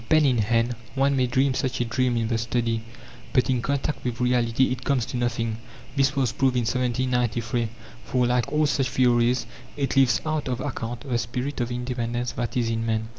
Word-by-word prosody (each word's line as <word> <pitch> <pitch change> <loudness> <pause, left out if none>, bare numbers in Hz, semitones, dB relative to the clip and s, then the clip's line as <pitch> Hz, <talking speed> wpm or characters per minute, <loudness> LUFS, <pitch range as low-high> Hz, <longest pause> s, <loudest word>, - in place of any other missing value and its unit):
Pen 155 -1 +5
in 125 -4 +3
hand, 115 +3 +2 0.2
one 135 +1 +3
may 130 -2 +2
dream 130 +2 +2
such 130 0 -1
a 120 - +1
dream 120 +1 +1
in 115 -1 0
the 115 0 0
study, 115 0 0 0.5
but 130 0 +3
in 125 -2 +1
contact 140 +3 -2
with 120 -2 -3
reality 125 0 +2
it 130 0 -3
comes 130 -4 +1
to - - -6
nothing, 115 -2 -1 0.4
this 135 0 +2
was 130 -4 +1
proved 130 -1 +1
in 125 - +2
1793; 120 -1 0 0.4
for, 125 -1 +1
like 125 +2 +1
all 150 +1 +3
such 135 -3 +1
theories, 120 -1 +3 0.3
it 140 -1 -1
leaves 125 -5 +4
out 155 -2 -1
of 125 -2 -2
account 120 -4 -4
the 130 -4 -1
spirit 125 +4 -3
of 120 - -1
independence 120 -1 -2
that 120 +1 -3
is 115 -2 +1
in 115 0 -1
man. 110 -1 -1
125 Hz, 200 wpm, -25 LUFS, 120-130 Hz, 0.5 s, Pen